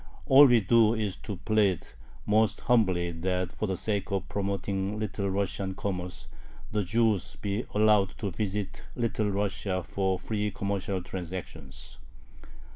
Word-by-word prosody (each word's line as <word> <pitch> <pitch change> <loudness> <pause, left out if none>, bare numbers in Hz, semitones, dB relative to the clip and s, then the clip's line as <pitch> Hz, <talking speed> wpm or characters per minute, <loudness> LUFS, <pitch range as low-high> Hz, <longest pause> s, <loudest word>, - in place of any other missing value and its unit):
All 140 +2 +8
we 120 -3 +5
do 115 +3 +4
is 105 -4 -2
to 105 - -6
plead 100 -2 +1 0.4
most 110 +1 +2
humbly 95 -8 +2
that, 90 +1 -2
for 110 - -3
the 95 -1 -2
sake 105 +1 -2
of 95 -1 -1
promoting 100 0 -2
Little 100 -2 -2
Russian 95 0 -2
commerce, 90 -3 -4 0.4
the 105 -1 0
Jews 105 - +1
be 100 +3 -3
allowed 105 -2 +3
to 100 -3 -3
visit 100 +1 -3
Little 115 -3 0
Russia 100 -2 -1
for 95 +1 -1
free 105 +1 -2
commercial 100 -2 -2
transactions. 85 -7 -7
100 Hz, 135 wpm, -28 LUFS, 95-105 Hz, 0.4 s, All